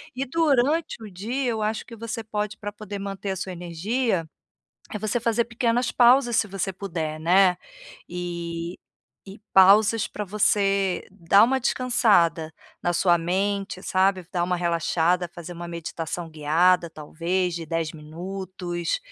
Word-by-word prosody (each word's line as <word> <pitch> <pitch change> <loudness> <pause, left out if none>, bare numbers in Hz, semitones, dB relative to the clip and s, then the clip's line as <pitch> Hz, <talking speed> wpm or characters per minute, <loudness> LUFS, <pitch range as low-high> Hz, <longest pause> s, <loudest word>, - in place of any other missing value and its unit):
E 270 - -2
durante 290 -1 +1
o 210 - -8
dia, 235 +9 -3
eu 220 - -3
acho 215 +1 -2
que 230 - -11
você 230 +1 -5
pode 210 0 -3
pra 205 -1 -5
poder 205 -1 -7
manter 195 0 -4
a - - -2
sua 190 0 -5
energia, 180 +4 -1 0.7
eh, 210 - -2
você 215 +3 -1
fazer 230 0 +1
pequenas 235 +1 0
pausas 240 -1 +5
se 225 - +2
você 195 0 -3
puder, 165 -5 -4
né? 180 +2 +4 0.5
E 170 -1 -5 0.5
e 195 +1 -10
pausas 205 +3 +6
pra 210 - -5
você 195 -2 +1
dar 195 +2 +4
uma 265 +2 +1
descansada 200 - +2 0.3
na 175 - +1
sua 175 0 +3
mente, 195 +2 -2
sabe? 185 -1 +1
Dar 175 -1 0
uma 180 0 0
relaxada, 170 +1 +1
fazer 175 +1 -8
uma 170 0 -7
meditação 170 0 -5
guiada, 165 +3 +2
talvez 170 +3 -2
de 165 -2 -5
10 165 -2 -2
minutos, 175 - -5
190 Hz, 150 wpm, -24 LUFS, 170-215 Hz, 0.7 s, pausas